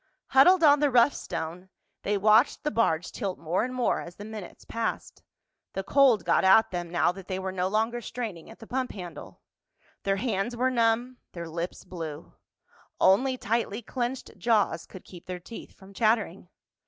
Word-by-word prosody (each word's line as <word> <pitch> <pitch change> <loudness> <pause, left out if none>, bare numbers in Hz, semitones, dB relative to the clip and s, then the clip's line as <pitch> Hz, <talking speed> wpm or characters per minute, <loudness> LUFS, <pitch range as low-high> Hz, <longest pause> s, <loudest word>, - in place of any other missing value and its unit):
Huddled 335 +7 +6
on 290 -1 +7
the 295 0 +3
rough 250 +2 +5
stone, 175 +4 -6 0.3
they 205 +1 0
watched 215 +5 +4
the 300 - -1
barge 175 - +1
tilt 195 -5 -4
more 170 +5 -1
and 250 - -3
more 255 -1 0
as 175 0 -10
the 205 - -9
minutes 215 -4 -9
passed. 230 0 -4 0.5
The 195 - -3
cold 250 -7 +4
got 170 - +3
at 190 +4 +5
them 175 -1 -4
now 175 0 +2
that 190 0 -11
they 185 - -3
were 190 0 -3
no 185 0 -1
longer 225 +4 0
straining 220 -8 -6
at 225 - -12
the 225 - -12
pump 255 +2 -3
handle. 175 -6 -9 0.6
Their 195 0 0
hands 225 +1 -2
were 255 +2 +2
numb, 240 +1 +1 0.2
their 170 -1 -6
lips 170 +3 -5
blue. 165 -4 -7 0.7
Only 255 +7 +4
tightly 230 -1 -2
clenched 245 +2 -4
jaws 225 -4 +1
could 185 - -12
keep 175 -2 -13
their 180 -1 -5
teeth 225 +6 -10
from 195 0 -15
chattering. 215 -5 0
210 Hz, 180 wpm, -27 LUFS, 180-240 Hz, 0.7 s, on